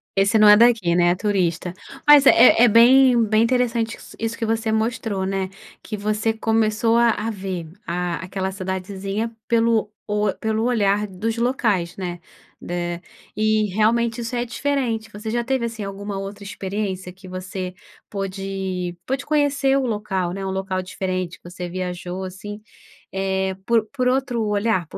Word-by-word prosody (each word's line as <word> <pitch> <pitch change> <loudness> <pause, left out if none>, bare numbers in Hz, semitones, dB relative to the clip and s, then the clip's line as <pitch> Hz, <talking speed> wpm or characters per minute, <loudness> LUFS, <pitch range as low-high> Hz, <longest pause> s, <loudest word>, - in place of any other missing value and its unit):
"Esse 195 +3 +3
não 215 - +7
é 210 - +9
daqui, 225 -7 +4
né, 175 0 +4
é 175 - +2
turista." 180 -3 -1 0.3
Mas 295 -2 +8
é 250 - +7
é 245 - +8
bem 245 +2 +6
bem 215 +1 +3
interessante 235 -2 0
isso - - -13
isso 225 0 -3
que 230 - -2
você 225 0 0
mostrou, 220 -3 -1
né, 190 -1 -2 0.3
que 215 - -5
você 215 +2 0
começou 225 +1 +1
a 235 0 +5
a 220 +1 -2
ver 190 -5 -5 0.2
a 175 0 -2
aquela 190 +1 -3
cidadezinha 195 +3 -4 0.2
pelo 230 -2 +2 0.2
o 210 -1 0
pelo 220 0 -1
olhar 210 -4 +2
dos 220 +4 -3
locais, 220 -8 0
né. 175 -2 -4 0.5
Eh, 175 -1 -2 0.4
e 215 0 +2
realmente 230 +2 +2
isso 235 +1 -4
é 240 - 0
diferente, 245 -3 -2
você 210 +2 -6
já 240 +1 0
teve, 260 -1 0
assim, 225 -2 -5
alguma 200 0 -5
outra 200 +1 -7
experiência 190 -2 -4
que 185 +1 -17
você 185 0 -5 0.4
pôde 190 -2 -4
pôde 265 +1 -2
conhecer 285 -2 +2
o 270 - 0
local, 195 -5 -2
né, 195 0 -5
um 190 - -2
local 190 0 -2
diferente, 185 -1 -4
que 175 - -12
você 180 0 -6
viajou, 180 0 -4
assim, 205 +3 -8 0.5
eh, 190 0 -1
por 230 -1 +2
por 255 -2 +1
outro 255 -3 0
olhar, 205 -4 0
por - - -9
210 Hz, 165 wpm, -22 LUFS, 190-230 Hz, 0.5 s, é